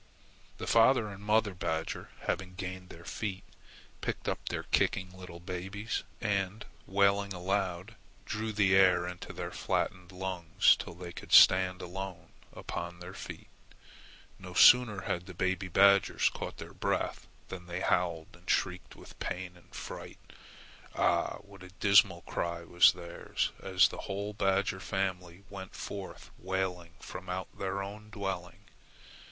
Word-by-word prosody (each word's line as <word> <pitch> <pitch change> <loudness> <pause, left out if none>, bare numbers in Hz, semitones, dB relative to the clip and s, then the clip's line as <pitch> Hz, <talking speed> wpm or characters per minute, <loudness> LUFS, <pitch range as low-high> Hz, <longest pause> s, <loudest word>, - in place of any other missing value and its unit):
The - - -5
father 115 -1 +4
and 100 0 -10
mother 105 -1 +2
badger, 80 -2 -3
having 90 -1 -3
gained 95 0 -6
their 85 0 -12
feet, 100 -4 -4 0.6
picked - - -3
up - - -2
their - - -3
kicking 95 -1 0
little 90 -2 -10
babes, 95 +5 -4 0.2
and, 100 -1 -1 0.2
wailing 100 0 +2
aloud, 95 +2 -2 0.3
drew 110 +1 -3
the 100 -2 +3
air 90 -2 +5
into 90 0 -7
their - - -5
flattened 90 0 -2
lungs 90 -3 +3
till 85 - -8
they 90 0 -8
could - - -10
stand 95 -1 +7
alone 95 -1 -7 0.2
upon 85 0 -6
their 90 +1 -8
feet. - - -8 0.9
No 90 -1 -10
sooner 115 -4 +7
had 85 0 -3
the 95 - -9
baby 95 +1 0
badgers 100 +2 +5
caught - - -6
their - - -9
breath - - -2 0.2
than 90 -2 -8
they 90 +1 -4
howled 85 -3 +1
and 85 +1 -14
shrieked 90 -1 0
with - - -14
pain 90 -1 -4
and 90 - -21
fright. - - -7 0.8
Ah! - - +2
what 100 -1 -15
a 95 - -10
dismal 100 -3 +5
cry 85 0 -3
was 85 +1 +6
theirs 85 -1 -3
as 95 -1 +4
the - - -8
whole 100 +2 -3
badger 95 -1 +1
family 95 -2 -3
went 95 -1 -8
forth 100 -2 -7
wailing 90 -2 -2
from 95 - -8
out 90 +1 -4
their 100 0 -2
own 105 +2 -9
dwelling! 95 -4 -5
95 Hz, 145 wpm, -31 LUFS, 90-100 Hz, 0.9 s, stand